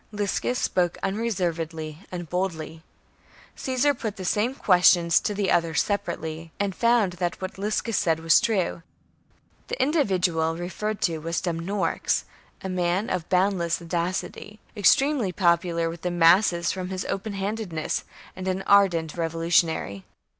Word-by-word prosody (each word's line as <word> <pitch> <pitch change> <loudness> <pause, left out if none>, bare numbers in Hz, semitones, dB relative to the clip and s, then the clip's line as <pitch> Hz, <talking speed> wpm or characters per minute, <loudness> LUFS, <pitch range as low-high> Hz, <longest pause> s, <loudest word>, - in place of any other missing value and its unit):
Liscus 210 +4 -1
spoke 175 -6 0
unreservedly 170 -7 -2
and 175 -2 -5
boldly. 165 -3 -3 0.7
Caesar 265 +2 +1
put 220 -5 -5
the 185 - -7
same 220 +8 0
questions 175 -5 +4
to 205 -2 -1
others 165 -2 +2
separately, 165 -5 -4
and 200 -1 0
found 230 -4 +2
that 175 0 -1
what 190 0 -6
Liscus 215 +2 -1
said 165 -4 +1
was 165 +1 +5
true. 190 -6 0 0.9
The - - -4
individual 185 - +1
referred 205 +5 -4
to 165 -2 0
was 165 +2 -2
Dumnorix, 175 +1 -1 0.4
a - - -3
man 180 +2 0
of 175 -2 -3
boundless 180 -2 +1
audacity, 175 +5 -4 0.2
extremely 265 +1 +3
popular 170 -2 +1
with 165 0 -6
the 180 - -1
masses 175 0 +4
from 185 -1 -5
his 190 0 -4
open 200 +2 -3
handedness, 195 -5 -3 0.3
and 185 0 -6
an 190 +1 -1
ardent 180 -6 +3
revolutionary. 165 - 0
180 Hz, 130 wpm, -25 LUFS, 165-205 Hz, 0.9 s, was